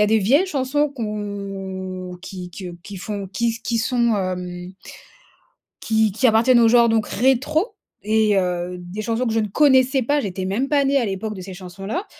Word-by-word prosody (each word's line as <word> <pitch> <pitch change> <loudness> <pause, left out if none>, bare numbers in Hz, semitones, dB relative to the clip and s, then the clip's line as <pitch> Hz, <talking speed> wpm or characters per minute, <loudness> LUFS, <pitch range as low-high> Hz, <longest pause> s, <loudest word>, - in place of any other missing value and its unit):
a 210 - +4
des 220 +1 +3
vieilles 275 - +3
chansons 290 -1 0
qu' 275 -3 -11
on 195 -3 -5
qui 180 -1 -8
que 180 -1 -8
qui 200 - -9
font 200 0 -5
qui 230 +3 0
qui 235 -2 -1
sont 235 -1 +1
hem, 180 -1 -4 1.1
qui 220 -2 +2
qui 250 +5 +2
appartiennent 235 +2 +5
au 230 - +6
genre 235 0 +6
donc 225 -2 +1
rétro 270 - +1 0.3
et, 215 -2 +3
heu, 180 -1 -1
des 180 +4 -6
chansons 230 +3 -1
que 230 - 0
je 225 - +2
ne 215 - 0
connaissais 265 +2 +4
pas. 285 +5 +1
J'étais 190 -6 -4
même 210 +9 -1
pas 285 -1 +2
née 275 +1 +2
à 245 - +1
l'époque 205 +2 -4
de 190 - -8
ces 190 0 -8
chansons-là, 195 - -5
215 Hz, 190 wpm, -21 LUFS, 190-250 Hz, 1.1 s, au